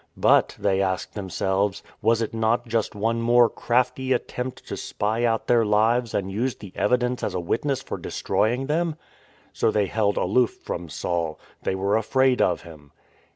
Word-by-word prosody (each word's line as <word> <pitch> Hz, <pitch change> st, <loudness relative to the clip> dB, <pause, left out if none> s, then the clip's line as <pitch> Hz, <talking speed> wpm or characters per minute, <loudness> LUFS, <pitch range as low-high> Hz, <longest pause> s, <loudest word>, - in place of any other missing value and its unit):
But -, -, +3 dB
(th^y 95 Hz, -2 st, +1 dB
asked 95 Hz, -1 st, -2 dB
themselves) 95 Hz, 0 st, -1 dB, 0.2 s
was 115 Hz, +1 st, +3 dB
it 110 Hz, -, -5 dB
not 115 Hz, +2 st, +1 dB
just 115 Hz, -2 st, -1 dB
one 115 Hz, +3 st, 0 dB
more 120 Hz, +1 st, +5 dB
crafty 125 Hz, +3 st, 0 dB
attempt 125 Hz, +1 st, -4 dB
to -, -, -4 dB
spy 110 Hz, +3 st, -1 dB
out 115 Hz, -1 st, 0 dB
their 120 Hz, -1 st, +4 dB
lives 110 Hz, +3 st, +2 dB
and 95 Hz, -1 st, -1 dB
use 120 Hz, +6 st, -1 dB
the 100 Hz, -4 st, -11 dB
evi 105 Hz, +7 st, +2 dB
dence 125 Hz, 0 st, -2 dB
as -, -, -2 dB
a -, -, 0 dB
witness 135 Hz, +9 st, -1 dB
for -, -, -5 dB
destroying 120 Hz, +5 st, 0 dB
them? 160 Hz, +2 st, 0 dB, 0.6 s
So -, -, +1 dB
they 105 Hz, -2 st, +2 dB
held 100 Hz, +1 st, 0 dB
aloof 120 Hz, +6 st, +2 dB
from 85 Hz, -1 st, -5 dB
Saul; 85 Hz, -1 st, -2 dB, 0.2 s
they 95 Hz, -, -1 dB
were 100 Hz, +2 st, +1 dB
afraid 130 Hz, +3 st, +2 dB
of 90 Hz, -, +2 dB
him. 75 Hz, -4 st, -14 dB
110 Hz, 175 wpm, -24 LUFS, 100-125 Hz, 0.6 s, more